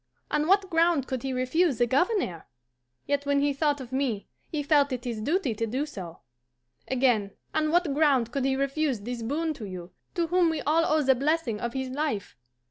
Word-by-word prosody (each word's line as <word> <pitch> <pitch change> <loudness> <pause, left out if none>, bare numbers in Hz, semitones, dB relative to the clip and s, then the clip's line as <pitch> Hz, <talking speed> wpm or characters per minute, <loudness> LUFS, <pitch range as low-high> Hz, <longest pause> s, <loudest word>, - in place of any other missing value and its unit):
On 300 +1 +1
what 390 +1 +4
ground 330 -5 +2
could 260 -2 -3
he 270 - -3
refuse 260 +4 +1
the 240 - +3
Governor? 275 - 0 0.6
Yet 285 0 -1
when 285 0 +3
he 285 0 +2
thought 290 0 +1
of 255 -2 -9
me 260 -6 -1 0.2
he 300 -2 -2
felt 285 -1 +3
it 250 -1 -4
his 230 -3 -3
duty 300 - 0
to 225 +2 -2
do 260 +7 -1
so. 185 - -9 0.7
Again, 245 -6 +1 0.2
on 310 0 +1
what 340 -3 +2
ground 275 -6 +3
could 275 +1 -1
he 270 0 +2
refuse 275 -3 0
this 240 +2 -5
boon 310 +7 -1
to 235 -7 -8
you, 180 -2 -8 0.2
to 340 -2 +1
whom 350 0 +3
we 320 -1 -1
all 325 +3 +2
owe 310 -1 +3
the 265 -1 +5
blessing 275 -4 0
of 235 +1 -3
his 265 -1 -3
life? 275 -8 -2
275 Hz, 205 wpm, -27 LUFS, 245-310 Hz, 0.7 s, the